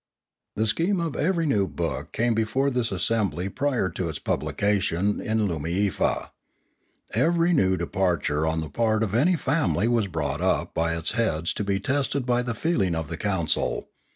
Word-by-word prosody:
The 110 - +1
scheme 170 - +2
of 165 -4 -2
every 170 0 +1
new 105 -10 +2
book 70 - -4
came 120 +1 +1
before 120 +6 +1
this 125 -2 0
assembly 95 -2 0
prior 130 -4 0
to 85 0 -3
its 75 - -4
publication 100 -1 0
in 110 -1 0
Loomiefa. 85 +4 -1 0.8
Every 170 +2 +3
new 95 - +3
departure 85 -3 0
on 80 0 0
the 80 - -5
part 110 -1 +1
of 105 -3 -2
any 155 +11 +4
family 145 -7 +1
was 115 -4 +2
brought 80 -5 -3
up - - 0
by 85 0 0
its 80 - -1
heads 85 -8 0
to - - -3
be 100 -1 0
tested 140 +2 0
by 120 -1 +2
the 120 -2 -3
feeling 105 - 0
of 80 -3 -3
the 85 - -4
council. 95 -6 -1
105 Hz, 170 wpm, -25 LUFS, 85-125 Hz, 0.8 s, any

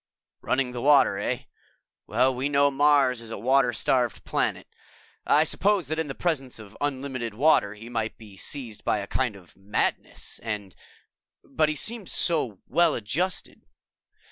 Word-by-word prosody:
"Running 130 -1 0
the 120 -1 -5
water, 145 0 +5
eh? - - -2 0.6
We 130 +4 +1
know 140 0 +3
Mars 140 -3 +3
is 115 - -9
a 115 - -5
water 130 +3 +3
starved 120 0 +1
planet. - - -1 0.6
I 150 - +5
suppose 190 -1 +1
that 155 +1 -1
in 160 - -1
the 135 - -5
presence 140 -7 -2
of 110 -2 -12
unlimited 130 -5 -3
water, 115 -6 +3
he 110 +2 -11
might 115 -2 -3
be 105 -3 -13
seized 120 -1 -4
by - - +1
a 100 - -4
kind 125 0 -1
of 90 -3 -16
madness 100 +2 -2
and... 105 -4 -5 0.7
But 155 -1 +1
he 155 - -1
seemed 215 - -1
so 130 - 0
well 170 -2 +3
adjusted." 165 - -3
130 Hz, 155 wpm, -26 LUFS, 110-145 Hz, 0.7 s, water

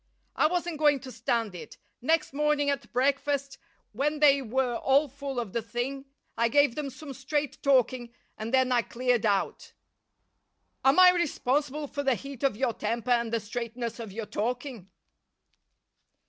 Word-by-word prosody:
I - - +4
wasn't 345 -2 -2
going 295 -2 +4
to 260 - -9
stand 230 -5 -1
it. 175 - -10 0.2
Next 310 +2 +1
morning 295 0 +1
at 280 - -5
breakfast, 275 +2 0 0.3
when 295 +7 -1
they 280 -2 +5
were 250 0 -1
all 280 +3 +3
full 275 -1 -5
of 225 -6 -5
the 235 - 0
thing, 245 +5 -4 0.3
I 235 +1 +2
gave 285 +1 +3
them 295 0 -4
some 280 +1 -9
straight 285 +2 -3
talking, 255 -3 +2 0.2
and 220 +1 -5
then 260 -1 +3
I 245 -1 +4
cleared 240 +1 0
out." 200 -2 -1 1.1
"Am 270 +4 +4
I 365 -1 +9
responsible 295 -3 -1
for 285 0 -4
the 270 -3 +2
heat 275 0 -9
of 275 -7 +1
your 250 -1 0
temper 230 +4 -2
and 235 -2 +2
the 230 - +1
straightness 235 +2 -5
of 225 -3 -7
your 220 +2 -5
talking?" 235 -1 -4
260 Hz, 160 wpm, -28 LUFS, 235-285 Hz, 1.1 s, I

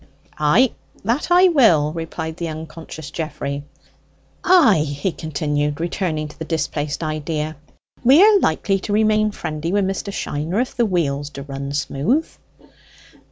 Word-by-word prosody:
"Ay, 180 - +4 0.3
that 235 +8 0
I 360 +1 +6
will," 175 - +4
replied 160 -1 -5
the 170 - -3
unconscious 160 -1 -8
Geoffrey. 140 -3 -4 0.8
"Ay," 335 - +6
he 150 +4 -2
continued, 150 -2 -2
returning 165 -2 -2
to 150 - -15
the - - -3
displaced 155 -1 -2
idea, 155 0 -3 0.5
"we 265 +5 +7
are 420 -1 +6
likely 195 - +1
to 205 - -4
remain 215 0 +3
friendly 160 -4 -4
wi' 205 +1 +2
Mr. 195 +1 -2
Shiner 165 +2 -2
if 250 - -2
the 235 -2 +2
wheels 145 -6 -1
d'run 140 -1 -6
smooth." 150 - 0
160 Hz, 135 wpm, -20 LUFS, 150-210 Hz, 0.8 s, we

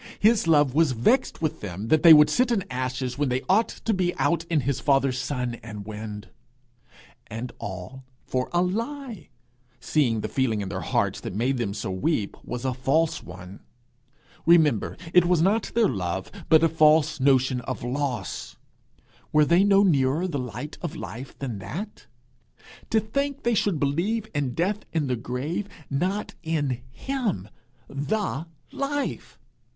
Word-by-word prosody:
His 215 -4 +3
love 145 -5 +4
was 155 -2 +3
vexed 165 - +1
with 155 - -1
them 100 +3 -5
that 155 - +4
they 170 - +9
would 150 -1 +8
sit 250 0 +2
in 210 -5 +1
ashes 130 0 -3
when 145 -2 +1
they 125 +1 -1
ought 215 +5 +4
to 225 - -2
be 180 -2 0
out 170 -1 +1
in 165 -3 +1
his 135 +1 -1
father's 135 -2 +2
sun 125 -3 -3
and 105 -3 -8
wind. 105 0 -7 1.0
And 115 +3 -6
all 100 +8 -7 0.2
for 130 0 -2
a 175 0 +2
lie! 230 - -4 0.5
since 120 -8 +1
the - - -1
feeling 115 -6 0
in 95 - -4
their - - -4
hearts - - 0
that - - -6
made 125 +5 +1
them 100 -4 -2
so 105 -3 -3
weep, 105 - -1
was 125 +1 -5
a 130 - +1
false 140 +6 +1
one. 90 +2 -10 0.9
Remember, 155 -10 +4 0.2
it 180 -1 +6
was 175 -2 +3
not 205 +6 +2
their 230 -2 +4
love, 95 - -3 0.2
but 160 0 +6
a - - +6
false 155 -1 +4
notion 130 -1 +3
of - - -5
loss. 130 -1 -3 0.7
Were 150 0 +5
they 170 +5 +4
no 200 0 +5
nearer 150 -1 +2
the 145 -6 -3
light 125 +5 -6
of 170 -2 -4
life 130 -3 -8
than 125 -7 -4
that? 195 - -7 0.8
To 220 - +3
think 280 +6 -2
they 235 - +2
should 200 -6 +1
believe 195 +11 0
in 135 -4 -1
death 195 +5 0
and 155 -4 0
the 125 - 0
grave, 140 - -4 0.2
not 185 +9 -1
in 145 -7 -1
him, 210 - -3 0.4
the 160 +1 -2 0.2
Life! 285 +1 -3
145 Hz, 165 wpm, -25 LUFS, 125-180 Hz, 1.0 s, they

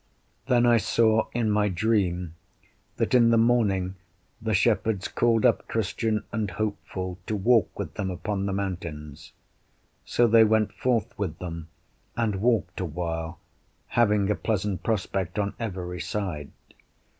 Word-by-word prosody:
Then 120 -2 +4
I 120 -1 +5
saw 110 0 +2
in 115 -3 0
my 105 0 +2
dream, 90 -4 0 0.6
that - - 0
in 120 -2 +6
the 115 - +4
morning 100 -6 +2 0.4
the 110 -1 0
shepherds 110 -1 +1
called 115 -2 +2
up - - +2
Christian 110 0 -1
and 110 -2 -1
Hopeful 95 -2 -4
to 110 - -1
walk 115 +2 +2
with - - -5
them 95 -2 -3
upon 100 +2 -3
the - - -1
mountains; 85 -7 -5 0.7
so 120 - +2
they 115 0 +6
went 110 -1 +2
forth 120 -3 0
with 85 -6 -2
them, 85 -2 -6 0.5
and 110 -4 0
walked 115 -6 +1
a 95 - -1
while, 80 0 -4 0.5
having 105 -3 +2
a - - +1
pleasant 100 -4 -2
prospect 95 -4 -2
on 100 -1 0
every 90 -5 -4
side. 90 -10 -4
105 Hz, 145 wpm, -26 LUFS, 90-115 Hz, 0.7 s, in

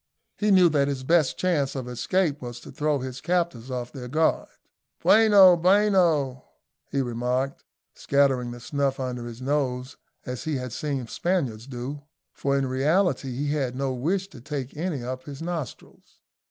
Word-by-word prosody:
He 210 - 0
knew 185 -3 +7
that 145 -3 +2
his 135 -2 -3
best 160 0 +2
chance 155 -8 0
of 130 -2 -4
escape 145 +6 0
was 120 -1 -7
to - - -11
throw 150 -1 0
his 130 0 -6
captors 170 -7 -1
off 125 -1 -4
their 125 -3 -7
guard. 155 +5 +1 0.5
"Bueno, 205 -5 +7
bueno," 175 -8 +3 0.5
he 140 -1 0
remarked, 125 +3 -2 0.3
scattering 135 -3 +1
the 120 0 -8
snuff 140 +1 -1
under 125 -2 -4
his 120 +2 -8
nose 130 -2 -1 0.3
as 125 -1 -5
he 155 -2 -1
had 125 -3 -4
seen 140 -4 -3
Spaniards 130 -6 -2
do, 135 +3 -6 0.3
for 140 0 0
in 135 - +1
reality 135 +1 +1
he 145 +3 -2
had 135 -4 -1
no 135 0 -1
wish 180 +10 -1
to 135 -10 -13
take 140 -1 -5
any 155 -5 -3
up 130 +1 -5
his 140 -2 -8
nostrils. 165 -4 -7
140 Hz, 165 wpm, -25 LUFS, 125-160 Hz, 0.5 s, knew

